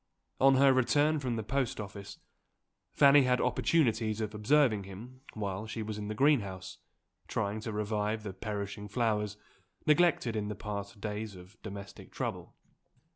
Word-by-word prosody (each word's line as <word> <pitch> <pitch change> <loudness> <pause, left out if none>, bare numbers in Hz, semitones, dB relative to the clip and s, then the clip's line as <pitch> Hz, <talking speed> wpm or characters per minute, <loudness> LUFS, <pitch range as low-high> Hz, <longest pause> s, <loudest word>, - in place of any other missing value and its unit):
On 135 0 +6
her 135 0 +6
return 145 +4 +3
from 125 -4 -2
the 110 - -3
post 130 +2 -1
office, 100 -1 -8 0.7
Fanny 140 0 +6
had 125 -1 +2
opportunities 115 -5 +1
of 110 -1 -3
observing 110 -2 +3
him 115 +7 -11
while 105 0 -4
she 110 0 -4
was 105 0 -5
in 105 - -5
the 110 - -4
greenhouse, 100 -9 +1 0.5
trying 100 +2 -2
to 110 +1 -5
revive 105 +1 -1
the 100 -3 -5
perishing 105 0 -5
flowers 105 -2 -1 0.5
neglected 150 -7 +3
in 105 -1 -1
the 105 - -4
past 100 -1 -6
days 105 0 -4
of 90 +3 -14
domestic 100 -2 -9
trouble. - - -5
110 Hz, 150 wpm, -31 LUFS, 105-125 Hz, 0.7 s, On